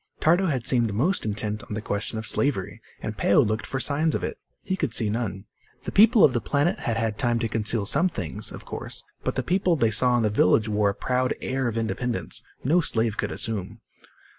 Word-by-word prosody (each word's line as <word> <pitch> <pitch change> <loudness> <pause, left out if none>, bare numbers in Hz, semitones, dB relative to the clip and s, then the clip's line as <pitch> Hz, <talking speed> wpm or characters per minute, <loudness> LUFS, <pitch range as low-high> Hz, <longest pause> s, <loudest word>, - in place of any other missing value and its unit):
Tardo 175 +4 +3
had 130 -7 -1
seemed 120 -4 +2
most 165 - +1
intent 105 0 -2
on 105 - -6
the - - -2
question 105 +2 -3
of 110 - -4
slavery, 140 -9 -1 0.2
and - - -4
Peo - - +3
looked 110 +2 +1
for 130 - -3
signs 150 +3 +1
of - - -3
it. - - -4 0.2
He 190 - -1
could 155 -10 -2
see 105 -2 +1
none. 105 -4 -3 0.4
The - - -4
people 220 +2 +6
of 130 - +6
the 120 - 0
planet 145 - 0
had 115 -1 -2
had 110 -1 -1
time 120 -3 +1
to 115 0 -1
conceal 110 -1 0
some 160 - +3
things, 95 - -5
of - - -10
course. - - -6 0.2
But - - -2
the - - -1
people 180 -1 +2
they 115 -7 +2
saw 120 +3 +3
in 120 - +1
the 105 - +1
village 105 +2 +3
wore 105 -1 +2
a 100 - -3
proud 125 +2 0
air 130 0 -1
of 115 -1 -3
independence 115 +2 -2 0.2
no 165 +7 +3
slave 115 -8 +1
could - - -2
assume. 105 -5 -3
115 Hz, 220 wpm, -25 LUFS, 110-140 Hz, 0.4 s, people